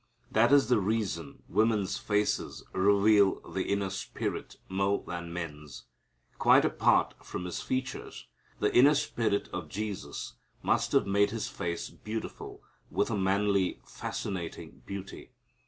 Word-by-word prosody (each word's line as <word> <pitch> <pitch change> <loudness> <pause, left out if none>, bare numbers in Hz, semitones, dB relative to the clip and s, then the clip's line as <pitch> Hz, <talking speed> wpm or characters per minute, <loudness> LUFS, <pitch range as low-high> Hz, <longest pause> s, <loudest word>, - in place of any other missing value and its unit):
That 115 +3 +4
is 140 -5 +6
the 125 -3 +4
reason 105 0 -2
women's 105 -1 +1
faces 105 0 0
reveal 100 +1 +4
the 95 - -2
inner 100 -1 0
spirit 95 - -4
more 95 +1 0
than 85 -1 -5
men's. 75 -5 -7 0.6
Quite - - +6
apart - - +3
from 90 - -5
His 90 - -4
features, 130 0 -4 0.3
the - - +1
inner 140 +5 +7
spirit 115 -8 0
of 90 -4 -4
Jesus 105 +2 -5 0.3
must - - +1
have - - +4
made 100 +1 +3
His 115 -1 -3
face 85 -1 -4
beautiful 110 +1 -6 0.3
with - - 0
a - - +1
manly 100 0 +1
fascinating 85 -8 -5
beauty. 100 -1 -7
100 Hz, 130 wpm, -30 LUFS, 95-110 Hz, 0.6 s, inner